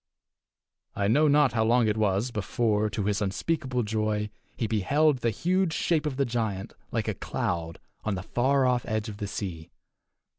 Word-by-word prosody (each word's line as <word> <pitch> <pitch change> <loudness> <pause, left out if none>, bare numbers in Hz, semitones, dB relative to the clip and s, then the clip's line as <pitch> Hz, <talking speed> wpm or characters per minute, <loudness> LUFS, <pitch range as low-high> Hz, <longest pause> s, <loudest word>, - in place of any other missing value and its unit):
I 100 - +1
know 145 +8 +4
not 145 -4 +4
how 110 -2 +2
long 115 +1 +3
it 105 - +1
was 105 +2 +1
before, 110 0 0
to 105 - -2
his 105 +1 0
unspeakable 125 +5 -1
joy, 105 -1 -1 0.3
he 115 - 0
beheld 135 +7 +2
the 120 - +1
huge 180 - +1
shape 160 -3 +1
of 135 -3 -3
the 140 - +2
giant, 110 -5 -2 0.2
like - - -1
a - - 0
cloud, 85 -2 -3 0.3
on 105 -2 -1
the 95 - -5
far 130 +5 +2
off 125 -1 +2
edge 110 0 -1
of 105 - -8
the 105 -1 -4
sea. 90 -5 -5
110 Hz, 180 wpm, -27 LUFS, 105-130 Hz, 0.3 s, know